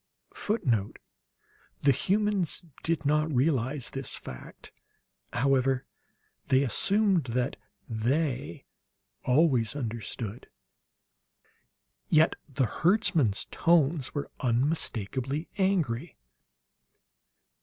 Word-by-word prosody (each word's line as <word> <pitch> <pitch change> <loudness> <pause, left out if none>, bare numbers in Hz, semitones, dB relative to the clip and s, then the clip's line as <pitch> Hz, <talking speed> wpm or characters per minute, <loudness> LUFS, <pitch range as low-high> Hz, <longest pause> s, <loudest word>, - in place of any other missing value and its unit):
[Footnote: 120 - -1 0.8
The 140 - +5
humans 200 - 0 0.2
did 160 -2 0
not 150 +2 +2
realize 135 -1 0
this 135 0 -3
fact, 60 - -10 0.6
however; 130 0 +1 0.6
they 130 +1 +4
assumed 195 - +3
that 125 +2 -1 0.3
"They" 120 - -2 0.6
always 130 -4 +3
understood.] 115 -3 -5 1.6
Yet 155 +1 +4
the 135 -1 0
herdsman's 155 - +2
tones 160 -4 +2
were 145 - -4
unmistakably 130 - 0
angry. 170 -7 0
135 Hz, 75 wpm, -28 LUFS, 120-165 Hz, 1.6 s, The